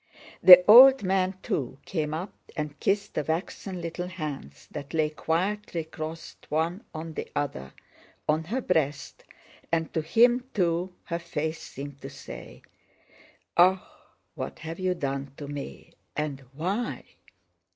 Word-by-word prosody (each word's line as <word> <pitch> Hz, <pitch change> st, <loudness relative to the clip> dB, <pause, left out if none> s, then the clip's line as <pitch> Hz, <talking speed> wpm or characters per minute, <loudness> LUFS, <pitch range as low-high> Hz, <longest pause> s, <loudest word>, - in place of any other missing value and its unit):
The 180 Hz, -1 st, +11 dB
old 260 Hz, +4 st, +10 dB
man 190 Hz, 0 st, +1 dB
too 130 Hz, -2 st, -2 dB
came 155 Hz, -4 st, -2 dB
up 170 Hz, +6 st, -4 dB, 0.2 s
and 150 Hz, -2 st, -4 dB
kissed 200 Hz, +1 st, 0 dB
the 150 Hz, -, -1 dB
waxen 175 Hz, +4 st, -3 dB
little 170 Hz, +2 st, -4 dB
hands 145 Hz, -, -7 dB
that 145 Hz, +1 st, -7 dB
lay 155 Hz, -1 st, +2 dB
quietly 175 Hz, +3 st, -1 dB
crossed 160 Hz, 0 st, -8 dB
one 165 Hz, +6 st, -1 dB
on 160 Hz, 0 st, -6 dB
the -, -, -5 dB
other 70 Hz, -, -3 dB, 0.5 s
on 155 Hz, +1 st, +1 dB
her 245 Hz, +9 st, -2 dB
breast, 150 Hz, -, -1 dB, 0.5 s
and 165 Hz, -1 st, 0 dB
to 160 Hz, -, 0 dB
him, 240 Hz, +9 st, +4 dB
too, 180 Hz, -1 st, 0 dB
her 170 Hz, 0 st, -3 dB
face 160 Hz, -2 st, -3 dB
seemed 140 Hz, 0 st, -9 dB
to 135 Hz, -, -7 dB
say: 135 Hz, -, -11 dB, 0.9 s
"Ah, 185 Hz, +2 st, +4 dB, 0.5 s
what -, -, -6 dB
have 160 Hz, +2 st, -7 dB
you 185 Hz, -1 st, 0 dB
done 140 Hz, -3 st, -3 dB
to 145 Hz, -, -7 dB
me, 140 Hz, -, -8 dB, 0.2 s
and 150 Hz, -3 st, -2 dB
why?" 180 Hz, -, -2 dB
160 Hz, 140 wpm, -27 LUFS, 150-185 Hz, 0.9 s, The